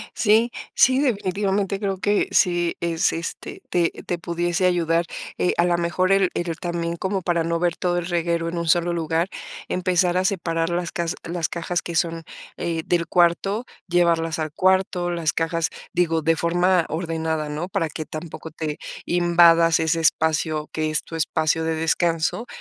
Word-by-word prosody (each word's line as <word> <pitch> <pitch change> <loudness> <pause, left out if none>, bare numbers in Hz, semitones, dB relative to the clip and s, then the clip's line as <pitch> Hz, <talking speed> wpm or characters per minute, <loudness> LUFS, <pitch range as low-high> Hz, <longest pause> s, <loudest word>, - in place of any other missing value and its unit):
Sí, 225 +2 +3 0.2
sí, 260 0 +5
definitivamente 200 -5 0
creo 195 -2 -2
que 205 +1 +1
sí 175 -2 +2
es, 170 +1 +1
este, 165 +1 -6
te 170 -2 +2
te 175 - -2
pudiese 175 +2 -1
ayudar, 170 -1 +2 0.3
eh, 180 - +1
a 170 - +4
la 175 0 +2
mejor 175 +2 0
el 195 -2 +4
el 170 -1 -2
también 170 -1 -3
como 190 +2 -2
para 170 -2 0
no 170 0 0
ver 175 0 0
todo 175 -1 0
el 175 - -2
reguero 170 -1 -1
en 170 - -5
un 170 0 -2
solo 175 +1 +3
lugar, 165 +1 -1 0.4
empezar 180 -1 +1
a 185 - +1
separar 165 -4 0
las 175 0 -2
cas 170 -1 -2
las 170 -1 -2
cajas 175 +1 -2
que 170 - -6
son, 165 0 0 0.3
eh, 165 -1 -2
del 170 -1 0
cuarto, 180 +7 +2 0.2
llevarlas 170 -2 +2
al 155 -1 -2
cuarto, 185 0 +1
las 170 -3 0
cajas 165 0 -1 0.2
digo, 165 -2 +1
de 165 +1 +2
forma 175 +1 +2
ordenada, 160 -2 -2
¿no? 150 +5 -4
Para 165 -3 0
que 155 +2 -6
tampoco 160 +1 -8
te 155 -1 -4 0.3
invadas 170 -1 +5
ese 160 +1 +1
espacio, 155 -1 +1
que 155 0 -1
es 155 0 0
tu 165 - -9
espacio 160 0 0
de 160 0 0
descanso, 165 +6 0
170 Hz, 175 wpm, -23 LUFS, 165-180 Hz, 0.4 s, sí